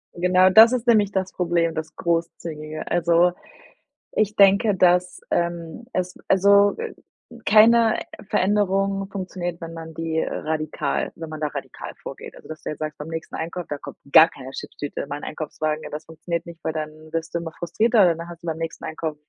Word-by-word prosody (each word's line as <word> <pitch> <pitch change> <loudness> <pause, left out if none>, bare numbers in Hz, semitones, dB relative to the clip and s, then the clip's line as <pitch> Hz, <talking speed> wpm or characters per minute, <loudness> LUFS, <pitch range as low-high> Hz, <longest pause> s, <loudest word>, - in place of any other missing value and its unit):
Genau, 180 +1 +4
das 225 +5 +8
ist 245 -1 -1
nämlich 210 -4 +4
das 190 -1 -1
Problem, 170 -2 +1
das 160 -1 -5
Großzügige. 165 -2 -3
Also, 175 0 +3 0.8
ich 215 0 0
denke, 200 +1 +5
dass, 180 0 +3
ähm, 170 +5 -2
es 180 0 -1
also, 200 +1 +5
äh, 465 0 -5 0.5
keine 225 +1 +6 0.3
Veränderung 195 0 +1
funktioniert, 180 -3 -5
wenn 165 0 -7
man 160 -1 -8
die 160 0 -2
radikal 155 0 -2
wenn 165 -1 -8
man 155 - -7
da 155 - 0
radikal 145 - -7
vorgeht. - - -9
Also, - - -15
dass 155 - -8
du - - -4
jetzt 150 - -8
sagst: 155 0 -4
„Beim 150 - -7
nächsten 165 +2 -6
Einkauf, 170 +2 -4
da 145 - -3
kommt - - -10 0.2
gar 160 - +9
keine 135 -5 -10
Chipstüte 145 +1 -7
in - - -9
meinen 145 +1 -6
Einkaufswagen.“ 155 0 -3
Ja, - - -6
das 150 +1 -6
funktioniert 170 +1 -4
nicht, 170 -1 -11
weil 160 - -1
dann 155 -1 -3 0.2
wirst 165 0 -3
du 170 - 0
immer 165 -1 -7
frustrierter. 200 +2 +3
Dann 170 +1 -8
hast 170 0 -11
du - - -8
beim 160 -1 -2
nächsten 165 0 -5
Einkauf 160 -1 -4
170 Hz, 185 wpm, -23 LUFS, 160-195 Hz, 0.8 s, gar